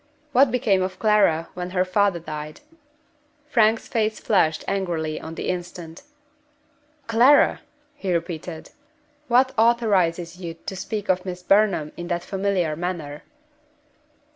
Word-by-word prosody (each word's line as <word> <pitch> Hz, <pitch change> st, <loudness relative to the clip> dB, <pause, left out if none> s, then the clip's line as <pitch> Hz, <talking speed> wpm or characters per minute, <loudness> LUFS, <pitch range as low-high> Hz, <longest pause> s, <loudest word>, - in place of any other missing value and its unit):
"What 265 Hz, +1 st, +5 dB
became 220 Hz, -6 st, +1 dB
of 185 Hz, 0 st, -3 dB
Clara 200 Hz, -7 st, +2 dB
when 180 Hz, 0 st, -5 dB
her 185 Hz, 0 st, 0 dB
father 195 Hz, 0 st, +2 dB
died?" 155 Hz, -2 st, -7 dB, 0.9 s
Frank's 225 Hz, -5 st, +2 dB
face 220 Hz, -1 st, -1 dB
flushed 160 Hz, -7 st, +1 dB
angrily 170 Hz, -5 st, -2 dB
on 160 Hz, +1 st, -8 dB
the -, -, -5 dB
instant. 175 Hz, -2 st, -5 dB, 1.0 s
"Clara!" 245 Hz, +5 st, +4 dB, 0.3 s
he 190 Hz, -, -4 dB
repeated. 165 Hz, -1 st, -4 dB, 0.6 s
"What 255 Hz, +2 st, +4 dB
authorizes 185 Hz, -7 st, +2 dB
you 170 Hz, -3 st, -7 dB
to 180 Hz, +3 st, -8 dB
speak 205 Hz, +2 st, -5 dB
of 185 Hz, -1 st, +1 dB
Miss 180 Hz, -1 st, -6 dB
Burnham 195 Hz, -6 st, +2 dB
in 175 Hz, -, -6 dB
that 175 Hz, 0 st, -2 dB
familiar 190 Hz, -5 st, -1 dB
manner?" 160 Hz, -4 st, -5 dB
185 Hz, 125 wpm, -23 LUFS, 170-210 Hz, 1.0 s, What